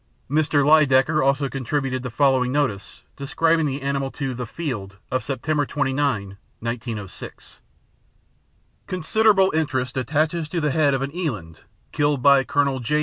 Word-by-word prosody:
Mr. 145 0 +2
Lydekker 150 -1 +4
also 140 +1 +2
contributed 135 0 -2
the 125 - -5
following 130 0 +2
notice 130 -9 -2
describing 160 +3 +1
the 140 0 -4
animal 140 -1 -1
to 135 -1 -4
The 125 -1 -5
Field 105 - -5
of 130 -2 -1
September 145 +4 -1
29, 135 -8 -1 0.2
1906: 115 -4 -7 1.3
"Considerable 190 +2 +3
interest 135 -5 -1
attaches 155 +5 -1
to 175 - -2
the 150 -2 0
head 145 -1 +2
of 135 - -2
an 140 +4 -5
eland, 105 - -4 0.3
killed 145 -3 0
by 140 -1 +6
Colonel 140 0 0
J. 150 +5 0
140 Hz, 140 wpm, -22 LUFS, 130-150 Hz, 1.3 s, by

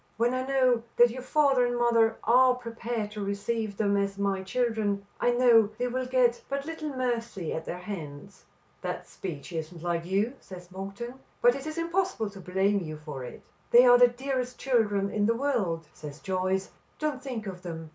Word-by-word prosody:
When 235 +2 +2
I 255 0 -1
know 255 -3 +3 0.2
that 240 -1 +7
your 255 +2 -6
father 270 -1 +3
and 245 0 0
mother 230 -2 +3
are 250 +2 +5
prepared 230 -3 -4
to 210 -1 -5
receive 200 +1 -2
them 200 -2 +2
as 200 0 -1
my 200 -1 0
children, 210 -1 -1
I - - +2
know 240 -3 +5
they 245 - -1
will 255 +1 -2
get 250 -2 +2
but 275 0 -2
little 320 -1 -5
mercy 235 - -2
at 160 - -4
their 175 - -4
hands." 180 -1 -8 0.4
"That - - -4
speech 170 -2 -7
isn't 165 +1 -5
like 170 -1 -1
you," 200 +6 +1
says 180 -1 -12
Monkton, 200 +7 -7 0.2
"but 245 0 +5
it 275 +3 -6
is 310 +1 -5
impossible 335 - -1
to 195 -1 -11
blame 190 +3 +1
you 155 -4 -6
for 150 -4 -7
it." 125 - -10 0.3
"They 245 +1 +8
are 245 0 +7
the 245 - +9
dearest 255 0 -3
children 205 -6 +1
in 205 0 +1
the 230 - +2
world," 220 - -1
says 150 0 -9
Joyce. 190 0 -1 0.3
"Don't 300 -4 -2
think 250 -5 -5
of 185 -3 -6
them. 165 -3 -7
225 Hz, 190 wpm, -28 LUFS, 190-250 Hz, 0.4 s, the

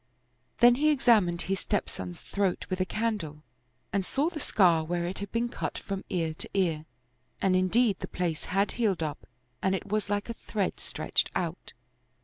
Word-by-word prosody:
Then 240 0 +9
he 305 - +5
ex 290 -3 +1
amined 185 -8 +5
his 195 +1 -1
stepson's 95 - -3
throat 195 -2 -1
with 185 - -1
a 185 - +1
candle 195 -11 -2 0.5
and 200 -1 +2
saw 285 - 0
the 315 - -5
scar 175 - +4
where 170 +2 -1
it 180 +2 -4
had 200 -1 -5
been 230 +1 +1
cut 240 - -4
from 195 -1 -4
ear 165 -3 0
to - - -4
ear, 165 -5 +1 0.5
and 190 -1 +3
indeed 195 +3 +3
the - - -4
place 170 -3 -2
had 195 +2 +1
healed 200 -8 +1
up 150 -2 -5 0.3
and 190 0 +2
it - - -4
was 215 -1 0
like 205 0 0
a 230 - -3
thread 205 -4 -2
stretched - - 0
out. 175 0 -3
190 Hz, 185 wpm, -29 LUFS, 175-215 Hz, 0.5 s, Then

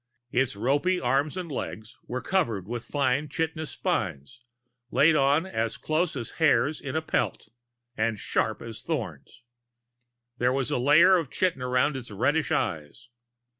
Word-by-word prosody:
Its 130 -3 +1
ropy 145 - +1
arms 140 +6 0
and 175 -4 -5
legs 110 -4 -5
were 125 +1 -4
covered 115 - 0
with 120 0 -5
fine 140 +1 0
chitinous 160 0 -2
spines, 70 - -3 0.5
laid 155 +5 +4
on 145 +4 +3
as 115 -11 -2
close 160 +1 0
as 120 -4 -5
hairs 155 -1 +3
in 140 +1 -5
a 160 - 0
pelt, 110 - -1 0.5
and 110 0 0
sharp 110 +2 -1
as 115 -2 -7
thorns. - - -5 1.0
There 125 +1 +2
was 135 -3 -1
a - - +1
layer 160 +8 +6
of 165 -6 -2
chitin 180 -4 0
around 125 +3 +1
its 130 -2 -7
reddish 135 +7 0
eyes. 80 +10 -2
135 Hz, 150 wpm, -27 LUFS, 120-155 Hz, 1.0 s, layer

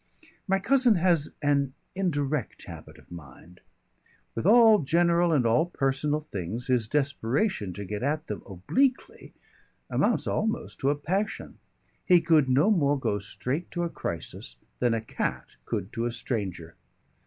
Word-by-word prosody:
My 195 0 +3
cousin 250 +2 +4
has 170 -4 +2
an 140 -2 +1 0.2
indirect 150 -6 -2
habit - - -11
of - - -20
mind. 85 +2 -12 0.7
With 115 - -2
all 225 -1 +7
general 170 +3 +2
and 140 -6 +2
all 120 +9 +3
personal 145 -1 -1
things 110 - -5
his 125 -4 +1
desperation 140 - 0
to 100 +3 -6
get 105 +2 -5
at 150 +4 -1
them 105 - -5
obliquely 245 - -1 0.6
amounts - - +1
almost 220 +1 -2
to 135 - +1
a 145 - +2
passion; 190 +8 -3 0.4
he 180 -2 +5
could 160 -5 +3
no 145 +11 +4
more 145 -7 +2
go 105 -5 -1
straight 130 - -4
to 175 - -3
a 170 - -1
crisis 80 - -5 0.2
than 120 -2 +2
a 115 - -2
cat 110 - -3 0.2
could 95 - -4
to 115 +1 -1
a - - -2
stranger. 95 - -4
145 Hz, 150 wpm, -27 LUFS, 115-175 Hz, 0.7 s, all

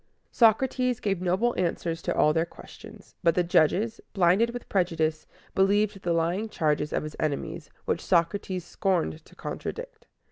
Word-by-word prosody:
Socrates 250 +2 +3
gave 195 -3 -1
noble 190 +7 +1
answers 170 -2 -1
to - - -2
all 150 - +4
their 165 0 +2
questions; 170 - -13
but 170 -2 +3
the 180 - +3
judges, 180 +6 +2
blinded 190 +5 +4
with 245 0 -7
prejudice, 160 -4 0 0.3
believed 200 +1 +2
the 175 - -1
lying 170 +6 0
charges 150 -5 0
of - - -1
his 155 0 -7
enemies, 155 +2 -3 0.2
which - - -1
Socrates 180 +1 0
scorned 175 -4 -1
to - - -19
contradict. - - -7
180 Hz, 150 wpm, -27 LUFS, 165-210 Hz, 0.3 s, all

